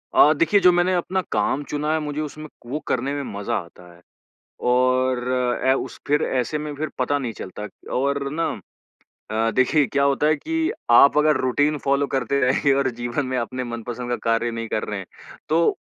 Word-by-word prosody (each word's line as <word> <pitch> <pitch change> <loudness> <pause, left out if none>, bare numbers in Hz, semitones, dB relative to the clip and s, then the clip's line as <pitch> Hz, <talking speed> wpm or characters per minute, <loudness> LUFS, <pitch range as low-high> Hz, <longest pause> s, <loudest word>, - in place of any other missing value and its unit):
अ, 150 - +7
देखिए 165 +7 +3
जो 180 -2 +6
मैंने 175 +1 +2
अपना 185 +2 -1
काम 110 +7 0
चुना 150 +1 -1
है 160 - +1
मुझे 150 -1 -4
उसमें 155 0 -6 0.2
वो 140 +6 -3
करने 130 +3 -1
में 145 - -3 0.2
मज़ा 100 - -2
आता 90 +1 -13
है। 85 - -21 0.7
और 130 0 +2
अ, 125 0 +1
उस - - -5
फिर 145 +1 +2
ऐसे 130 +4 -1
में 150 0 -5
फिर 155 +2 -3
पता 145 - +1
नहीं 125 -5 -4
चलता 105 0 -7 0.3
और 140 +1 0
ना 165 +2 0 0.8
अ, 110 +1 +1
देखिए 135 +5 +3
क्या 140 0 0
होता 140 +1 +2
है 155 - +4
कि 325 - -1 0.2
आप 140 +4 +7
अगर 150 -1 +4
रूटीन 145 +4 +1
फ़ॉलो 140 +1 +1
करते 135 0 0
रहेंगे 135 +2 +3
और 135 -1 +1
जीवन 120 +4 -2
में 130 0 -2
अपने 125 +2 -3
मनपसंद 120 +1 -6
का 120 - +1
कार्य 115 +1 +1
नहीं 115 0 -4
कर 110 - -2
रहे 105 -1 -4
हैं, 95 - -7 0.4
तो 165 +2 +2
135 Hz, 195 wpm, -23 LUFS, 120-150 Hz, 0.8 s, अ